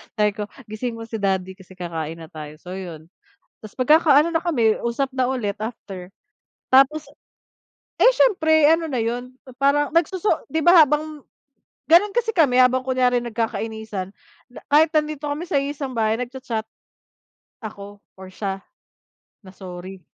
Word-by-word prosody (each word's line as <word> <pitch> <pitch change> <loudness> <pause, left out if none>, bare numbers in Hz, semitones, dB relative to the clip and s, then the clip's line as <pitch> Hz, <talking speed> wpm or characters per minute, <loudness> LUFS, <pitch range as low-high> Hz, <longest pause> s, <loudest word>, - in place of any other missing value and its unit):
Sabi 210 -2 +2
ko, 205 0 -6 0.2
"Gisingin 230 +2 -4
mo 230 - -8
si 225 -1 -6
daddy 190 -2 -1
kasi, 190 -1 -16
kakain 165 -3 -5
na 160 - -11
tayo," 150 -1 -9
so, 180 - -10
yun, 165 -4 -9 0.5
tapos 215 +1 -12
magkakaano 305 +3 +4
na 325 - +2
kami 235 -11 +2
usap 235 +4 -1
na 255 -1 +1
ulit 210 -6 -2
after, 195 -5 -8 0.6
tapos, 280 +4 +5 1.0
eh, - - +8
siyempre 315 -11 +4
ano 330 0 -1
na 260 - -2
yun, 245 +2 -4 0.3
parang 285 +1 +2
nagsoso 360 +5 0
'di 320 -1 -1
ba, 350 -1 +8
habang 300 0 0 0.6
ganun 375 +5 +4
kasi 460 -2 0
kami, 290 -9 +3
habang, 255 0 +4
kunyari, 255 -1 +1
nagkakainisan, 220 -3 -4 0.6
kahit 310 +2 +6
nandito 305 -1 -1
kami 295 +4 -4
sa 285 -5 0
iisang 280 -1 -5
bahay, 220 -1 0
nag-cha-chat, 245 -2 -5 1.0
ako 205 -2 -9 0.2
or 190 0 -11
siya, 195 0 -5 0.8
na 190 -3 -15
sorry. 185 0 -9
245 Hz, 145 wpm, -22 LUFS, 200-300 Hz, 1.0 s, eh